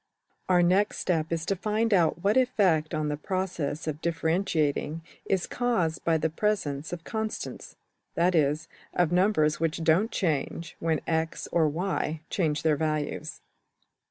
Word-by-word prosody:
\Pagelabel{diffrule2}% - - -33
Our 180 -1 +5
next 190 +4 +2
step 165 -3 0
is 165 -1 -1
to 195 - 0
find 215 +3 0
out 170 -2 +2
what 205 +2 +3
effect 190 -12 +2
on 155 -1 -1
the 150 - -2
process 170 -5 -3
of 155 -1 -4
differentiating 160 -2 0 0.2
is 190 -3 0
caused 205 -10 0
by 165 -1 +3
the 160 - +1
presence 160 -6 -1
of 175 -2 -5
\emph{constants}, 220 +2 -5 0.4
that 175 +2 +3
is, 150 -1 +1 0.3
of 175 -2 +2
numbers 175 -5 +3
which 165 0 -1
don't 170 +7 +3
change 165 - -2
when 160 -2 0
$x$~or~$y$ 160 0 -1
change 155 -5 0
their 155 -2 +3
values. 155 -1 -2
165 Hz, 145 wpm, -27 LUFS, 155-190 Hz, 0.4 s, Our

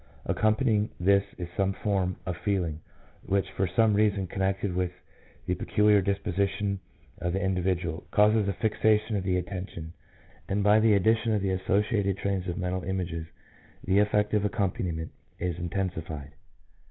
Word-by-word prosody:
Accompanying 110 -1 +2
this 100 +2 +4
is 90 - -4
some 95 -1 +1
form 95 -3 -1
of 90 - -2
feeling, 85 -5 -1 0.4
which 100 0 0
for 95 - 0
some 105 +5 +3
reason 100 -2 +2
connected 95 +1 -1
with 90 -1 0 0.5
the - - 0
peculiar 105 -1 +3
disposition 100 +1 -1 0.4
of 85 +1 -2
the 95 - 0
individual, 90 -3 -1
causes 105 0 +4
a 100 - 0
fixation 110 +1 +1
of 100 - -1
the 95 -1 +1
attention, 90 -3 -5 0.6
and 100 +1 +1
by 105 +1 +6
the 110 -1 +5
addition 110 +3 +2
of 105 -2 0
the 95 - +1
associated 100 +1 +1
trains 100 -2 -2
of 90 - -3
mental 90 -1 -2
images 85 -3 -3 0.6
the 95 +2 +3
affective 105 0 +2
accompaniment 90 -5 -1 0.3
is 90 -1 -2
intensified. 85 -5 -4
95 Hz, 145 wpm, -28 LUFS, 90-105 Hz, 0.6 s, by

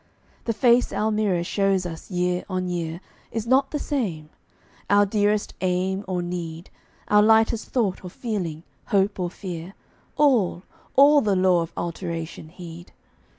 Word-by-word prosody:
The 230 - 0
face 240 +1 +3
our 220 +1 0
mirror 205 -5 +1
shows 195 0 +1
us 165 -2 -7
year 180 -1 0
on 185 -1 -2
year 170 -1 -3 0.3
Is 225 -1 -3
not 265 +3 +3
the 300 - -2
same; 185 - -3 0.6
our 205 0 +5
dearest 205 +1 +1
aim 190 +1 0
or 180 -2 -1
need, 170 -1 -5 0.4
Our 210 0 +6
lightest 220 +1 +3
thought 215 -8 -1
or 180 - -6
feeling, 175 -7 -4 0.2
hope 200 0 +1
or 180 -1 -1
fear, 180 0 -7 0.4
All, 230 -12 +3 0.3
all 285 +1 +7
the 205 -4 +1
law 185 -2 +4
of 165 - -5
alteration 170 -2 -5
heed. 175 0 -11
190 Hz, 150 wpm, -24 LUFS, 175-215 Hz, 0.6 s, all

